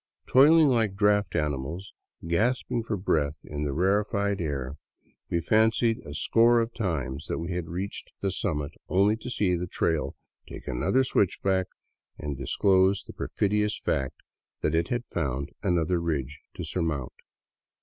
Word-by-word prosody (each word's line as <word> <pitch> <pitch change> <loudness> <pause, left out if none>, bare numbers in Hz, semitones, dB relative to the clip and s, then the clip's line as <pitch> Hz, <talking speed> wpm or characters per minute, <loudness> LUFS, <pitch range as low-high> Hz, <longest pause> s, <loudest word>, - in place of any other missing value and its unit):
Toiling 150 +3 +6
like 110 -6 +1
draft 105 -2 +2
animals, 75 +4 -2 0.3
gasping 115 +7 +1
for 110 -2 -3
breath 75 -5 -1
in 75 0 -4
the 70 - -1
rarefied 100 +4 +1
air, 70 -3 -3 0.5
we 85 - 0
fancied 110 +3 +3
a 75 - -9
score 115 +8 +4
of 115 0 -1
times 75 - -3
that - - -2
we 85 +2 -4
had 90 -2 -3
reached 95 +5 -5
the 100 - -1
summit, 75 -7 -2 0.2
only 100 +3 +4
to 120 - -7
see 100 -7 +1
the 90 +1 -3
trail 80 -3 -1 0.3
take - - -9
another 65 - +2
switchback 95 -5 +1 0.5
and 75 -1 -4
disclose 95 +8 +2
the - - -11
perfidious 105 +1 0
fact 65 -1 -1 0.5
that 75 - 0
it 80 +1 +2
had 120 -1 -2
found 70 -4 -3
another 85 0 +1
ridge 80 -7 -2 0.2
to - - -5
surmount. 80 -8 -2
90 Hz, 150 wpm, -27 LUFS, 75-105 Hz, 0.5 s, Toiling